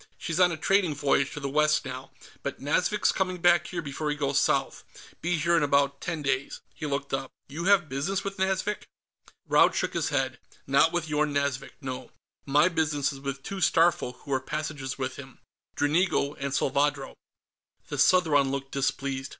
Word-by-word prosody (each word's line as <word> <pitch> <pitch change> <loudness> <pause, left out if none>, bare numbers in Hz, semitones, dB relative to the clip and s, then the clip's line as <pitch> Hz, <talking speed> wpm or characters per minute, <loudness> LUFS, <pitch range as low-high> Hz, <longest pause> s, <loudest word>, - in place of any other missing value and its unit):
"She's 165 +1 -3
on 180 -1 +5
a 160 - -3
trading 180 -1 +2
voyage 140 -1 +1
to - - -5
the 140 - -3
west 150 +1 +2
now, 130 0 -7 0.3
but - - -5
Nazvik's - - +1
coming 185 -1 -1
back 175 -1 +4
here 170 -2 -4
before 150 +1 -3
he 150 - 0
goes 140 -2 +1
south. - - 0 0.4
Be 175 +1 0
here 170 +2 +2
in 165 - +3
about 140 -1 +2
ten 165 -4 -3
days." 135 0 -1
He 155 - -5
looked 140 -1 -3
up. 135 -1 -2 0.2
"You 160 +5 -5
have 195 -4 +4
business 155 +9 -2
with 195 0 -5
Nazvik?" 190 +2 -1 0.6
Raud - - +4
shook - - -1
his - - 0
head. - - -1 0.3
"Not - - +4
with 175 -2 -2
Yorn 150 -1 0
Nazvik, 140 -1 -1
no. 130 -2 -6 0.4
My 145 +4 +4
business 150 -5 0
is 135 - -9
with 140 0 -4
the 135 - -31
two 195 -1 -5
Starfolk 165 -7 +2
who 140 - -4
are 130 - +1
passengers 150 -2 -4
with 130 -1 -4
him. 135 -2 -11 0.4
Dranigo 150 -1 +1
and 140 0 -3
Salvadro." 140 +1 0 0.8
The - - -4
Southron 155 -7 +4
looked 135 0 -4
displeased. 135 0 -2
145 Hz, 185 wpm, -27 LUFS, 140-170 Hz, 0.8 s, on